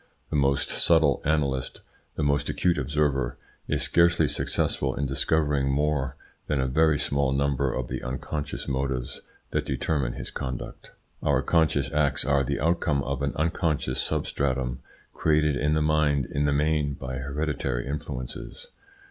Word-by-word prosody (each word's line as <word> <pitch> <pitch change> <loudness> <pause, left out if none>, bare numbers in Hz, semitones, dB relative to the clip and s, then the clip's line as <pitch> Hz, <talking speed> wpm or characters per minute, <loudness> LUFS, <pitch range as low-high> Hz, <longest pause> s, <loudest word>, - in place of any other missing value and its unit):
The - - -1
most 70 -1 +2
subtle 80 -5 +3
analyst, 70 -4 0 0.3
the 75 - -1
most 70 0 +1
acute 90 -1 +1
observer, 70 -5 0 0.3
is 75 -2 0
scarcely 85 +4 +4
successful 65 -2 0
in 70 - -1
discovering 70 +1 +1
more 70 -2 0 0.3
than 75 - 0
a 65 - +1
very 80 +3 +3
small 70 -1 +1
number 70 -1 +1
of 60 0 -3
the - - -4
unconscious 70 +3 -4
motives 65 -2 -2 0.3
that - - 0
determine 65 -1 -1
his - - -6
conduct. 65 -3 -6 0.3
Our - - +2
conscious 80 -4 +2
acts 75 -4 +1
are 70 0 +3
the 70 +2 -2
outcome 80 -2 +1
of 70 0 -3
an 70 0 0
unconscious 80 -5 0
substratum 65 -3 -1 0.3
created 75 -2 +2
in 75 +4 +1
the 75 - +2
mind 75 -3 +2
in 70 +3 -1
the 70 - +2
main 75 -1 +1
by 65 0 -5
hereditary 70 -3 -2
influences. 70 - -6
70 Hz, 150 wpm, -26 LUFS, 65-75 Hz, 0.3 s, scarcely